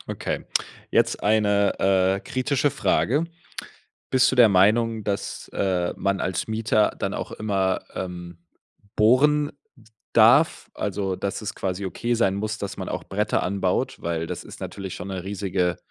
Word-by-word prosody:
Okay, - - -3 0.5
jetzt - - +2
eine, 105 -1 +2
äh, 95 0 +2
kritische 140 +5 0
Frage. 145 +4 +1 0.9
Bist 130 0 +4
du 130 - -2
der 120 -3 +8
Meinung, 110 +3 +3
dass, 100 -1 -3
äh, 90 -3 0
man 100 -1 0
als 95 +3 -2
Mieter 110 -1 +1
dann - - -2
auch - - -5
immer, 95 -3 0
ähm, 90 -2 -6 0.6
bohren 145 +7 +4 0.6
darf? - - +5
Also, 95 -2 -2
dass 100 - -3
es 105 - -4
quasi 95 +1 -3
okay 120 +6 -2
sein 95 -5 +2
muss, 105 +2 -3
dass 100 -1 -5
man - - -5
auch - - -4
Bretter 105 +2 -1
anbaut, 95 0 -1
weil 85 -1 -2
das - - -6
ist - - -11
natürlich 95 -2 -6
schon 95 - -7
'ne 95 -2 -5
riesige, 95 -3 -1
100 Hz, 150 wpm, -24 LUFS, 95-110 Hz, 0.9 s, der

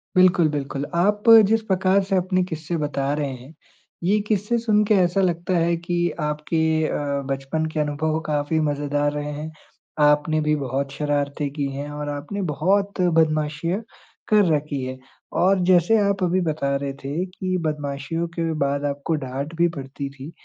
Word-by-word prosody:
बिल्कुल, 180 -2 +5
बिल्कुल। 140 -1 -3
आप 205 +5 +2 0.2
जिस 225 +2 +2
प्रकार 190 -1 +2
से 195 0 -1
अपने 185 0 +1
क़िस्से 165 -1 -4
बता 145 -2 -1
रहे 145 -1 -1
हैं, 130 +4 -12 0.5
ये 200 +5 +3
क़िस्से 210 +2 +1
सुनके 210 -2 +3
ऐसा 185 0 +2
लगता 175 0 0
है 170 0 +2
कि 175 0 -1
आपके 150 +1 -1 0.3
अ, 140 -1 -2
बचपन 135 +4 -2
के 155 - -1
अनुभव 150 +1 0
काफ़ी 150 +1 0
मज़ेदार 145 -1 0
रहे 150 0 -3
हैं। 150 +2 -6 0.5
आपने 150 +1 +3
भी 150 0 +2
बहुत 135 0 -2
शरारतें 145 0 -1
की 145 -1 -2
हैं 145 +2 -5
और 145 0 -5
आपने 145 +8 -4
बहुत 195 +5 +1
बदमाशियाँ 160 +2 +1 0.5
कर 210 -2 +5
रखी 145 -2 -3
है। 130 0 -5 0.4
और 190 +2 +4
जैसे 180 +4 +4
आप 195 -2 0
अभी 180 +1 +2
बता 150 -4 -1
रहे 140 0 -3
थे 150 +7 -2
कि 185 0 -3
बदमाशियों 150 +1 -3
के 165 -1 -1
बाद 140 +1 -1
आपको 145 +3 -2
डाँट 135 +5 -5
भी 170 +1 +3
पड़ती 140 -3 -6
थी, 140 +3 -10
155 Hz, 165 wpm, -23 LUFS, 145-180 Hz, 0.5 s, बिल्कुल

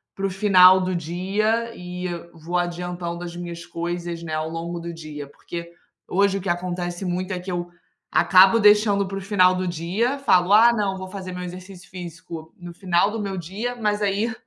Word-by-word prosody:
para 195 - -3
o - - -3
final 190 -1 +6
do 185 0 -1
dia 200 +8 -1
e 180 0 -6 0.3
vou 170 +2 -3
adiantando 175 0 -3
as 175 -1 -7
minhas 170 -1 -7
coisas, 170 0 -4
né, 165 -2 -6
ao 155 +1 -2
longo 170 +1 -5
do 170 0 -6
dia? 155 -3 -8
Porque 170 +4 -8 0.4
hoje 195 +1 +2
o - - -5
que 190 - -4
acontece 175 +1 -3
muito, 180 +2 -2
é 180 - -3
que 180 +1 -6
eu 175 0 -3 0.4
acabo 190 +4 +6
deixando 210 -1 +4
para 195 +1 -5
o - - -5
final 185 -2 +4
do 185 0 -2
dia, 185 - -1
falo, 185 -9 +3
"Ah 230 +3 +7
não, 200 -4 -1
vou 190 0 -7
fazer 185 -1 -7
meu 180 0 -6
exercício 180 +1 -10
físico 170 -2 -9
no 175 -1 -9
final 185 +2 +1
do 225 - -4
meu 195 -2 -4
dia", 200 +8 -4
mas 210 -3 -1
aí 205 +3 0
180 Hz, 195 wpm, -23 LUFS, 175-195 Hz, 0.4 s, Ah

